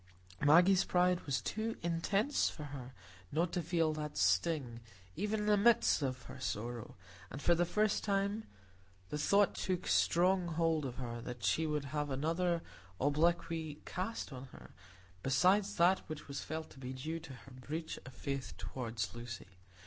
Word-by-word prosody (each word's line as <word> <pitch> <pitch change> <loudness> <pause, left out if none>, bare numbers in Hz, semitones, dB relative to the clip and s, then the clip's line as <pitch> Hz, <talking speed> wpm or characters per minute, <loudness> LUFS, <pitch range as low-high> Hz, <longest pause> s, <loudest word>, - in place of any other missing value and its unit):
Maggie's 180 +6 +6
pride 180 0 +2
was 140 - 0
too 225 +1 -2
intense 195 +10 +1
for 150 - -8
her 135 -3 -8 0.4
not 165 +3 0
to 175 - 0
feel 165 -1 +1
that 150 -4 -5
sting, 115 - +1 0.4
even 210 +1 -1
in - - -1
the 210 0 +5
midst 220 -4 +4
of 130 -2 -2
her - - -10
sorrow; 115 +2 -4 0.3
and 135 - -6
for 170 - +4
the 175 0 +2
first 215 +2 +1
time 200 +1 0 0.6
the - - -2
thought 200 +5 +4
took 185 -2 -2
strong 180 +1 +3
hold 165 -2 +1
of 125 -2 -4
her 120 -2 -5
that 120 -1 -7
she 160 +12 +2
would 150 -2 -1
have 150 +1 -2
other 165 +5 0 0.4
obloquy 155 +1 +1
cast 185 -4 -4
on 130 0 -7
her 130 - -14 0.5
besides 190 - +3
that 180 +3 +5
which 155 -1 -6
was 140 -1 -4
felt 160 +1 -5
to 135 - -14
be 130 0 -5
due 155 +6 -4
to 140 -4 -10
her 125 +2 -13
breach 150 +6 -5
of 130 - -10
faith 135 - -4
toward 115 +4 -6
Lucy. 115 -5 -8
155 Hz, 165 wpm, -35 LUFS, 130-180 Hz, 0.6 s, Maggie's